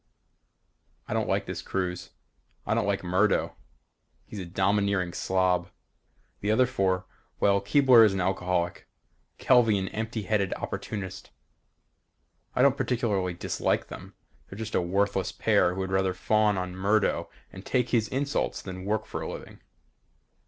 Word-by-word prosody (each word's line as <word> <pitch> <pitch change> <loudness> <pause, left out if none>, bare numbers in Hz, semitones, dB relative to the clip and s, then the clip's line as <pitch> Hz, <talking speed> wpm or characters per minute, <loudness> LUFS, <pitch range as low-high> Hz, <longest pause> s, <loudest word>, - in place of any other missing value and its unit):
I - - -3
don't - - -1
like - - 0
this - - -5
cruise. 90 -2 -3 0.6
I 105 - 0
don't 110 -2 0
like 100 -2 0
Murdo. 95 +4 +1 0.7
He's 105 - -8
a 95 - -5
domineering 95 -1 +1
slob. 90 -1 +1 0.7
The 100 - -2
other 110 +4 +4
four, 95 -6 0 0.3
well 100 0 +3
Keebler 125 +2 +6
is 110 - +5
an 95 - -2
alcoholic, 90 -2 -1 0.5
Kelvey 120 -5 +4
an 95 -1 -2
empty 110 0 -4
headed 100 -2 0
opportunist. 100 -4 -6 1.3
I 125 - +3
don't 140 0 +4
particularly 115 -8 0
dislike - - -1
them. - - -10 0.3
They're 95 - -9
just 110 0 -6
a - - +2
worthless 95 +1 0
pair 90 - +2
who 95 - -3
would 95 0 -3
rather 95 -1 +1
fawn 105 +1 +2
on 90 0 -4
Murdo 100 +3 +1 0.2
and 95 - -9
take 125 +1 0
his 115 -3 +2
insults 140 +4 -1
than 95 -1 -7
work 110 +1 -1
for - - -5
a - - -4
living. - - -10
100 Hz, 150 wpm, -27 LUFS, 95-110 Hz, 1.3 s, Keebler